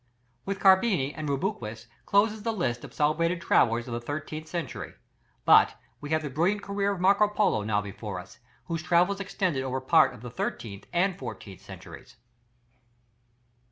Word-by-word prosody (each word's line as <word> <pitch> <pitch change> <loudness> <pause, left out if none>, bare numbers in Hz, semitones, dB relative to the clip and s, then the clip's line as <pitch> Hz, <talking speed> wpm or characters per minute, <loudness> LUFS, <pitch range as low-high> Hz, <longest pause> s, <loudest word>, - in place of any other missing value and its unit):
With 195 0 -3
Carpini 190 - +4
and 155 -2 -4
Rubruquis 125 - -3 0.2
closes 210 +2 +3
the 230 +2 -1
list 120 - -2
of - - -9
celebrated 165 +4 +1
travellers 120 -7 +2
of 120 - -5
the 120 - -3
thirteenth 155 +4 -5
century, 165 -5 -5 0.5
but - - +6 0.2
we 145 - -8
have 155 0 +1
the 150 - -3
brilliant 180 +9 +1
career 200 0 -1
of 195 - -4
Marco 200 +3 +4
Polo 210 - +1
now 105 -1 +1
before 100 -1 -6
us, 90 +2 -13 0.3
whose 165 +2 -3
travels 180 +4 +2
extended 185 -7 -1
over 130 0 -2
part 145 0 +4
of 120 - -14
the 125 - -7
thirteenth 105 -4 -5
and 180 +1 +1
fourteenth 110 -6 -8
centuries. - - -12
155 Hz, 160 wpm, -27 LUFS, 120-195 Hz, 0.5 s, but